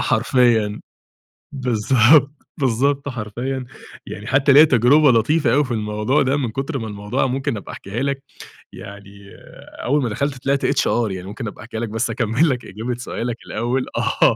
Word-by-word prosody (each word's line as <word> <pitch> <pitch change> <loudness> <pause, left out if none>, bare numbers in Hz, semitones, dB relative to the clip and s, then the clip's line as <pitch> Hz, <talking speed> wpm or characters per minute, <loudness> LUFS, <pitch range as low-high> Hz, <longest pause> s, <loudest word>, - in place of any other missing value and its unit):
حرفيًا، 115 -5 +2 0.7
بالضبط، 130 +2 +3 0.3
بالضبط 140 +3 0
حرفيًا، 125 +3 -4 0.4
يعني 105 +4 -8
حتى 135 +2 +3
ليّا 150 +2 +9
تَجرُبة 140 +1 +5
لطيفة 125 +3 +2
أوي 145 +1 +4
في 130 - -6
الموضوع 105 +5 0
ده 135 +2 +1
من 125 -5 -2
كُتر 135 +4 -3
ما 110 - -5
الموضوع 105 +6 -2
ممكن 135 -1 -2
أبقى 100 - -9
أحكيها 110 +7 -5
لك، 140 0 -2 0.5
يعني 100 0 -12 0.5
أول 145 +4 +1
ما 120 - -1
دَخَلت 135 +4 -3
طِلعت 140 0 0
HR 120 -6 +1
يعني 95 0 -6
ممكن 110 +3 -6
أبقى 105 - -9
أحكيها 115 -1 -6
لك 115 -2 -3
بس 110 +2 -2
أكَمَّل 115 +7 +1
لك 125 -2 -2
إجابة 115 +5 -5
سؤالك 120 -1 -4
الأول 120 +3 -2
آه. - - +2
125 Hz, 165 wpm, -20 LUFS, 110-135 Hz, 0.7 s, ليّا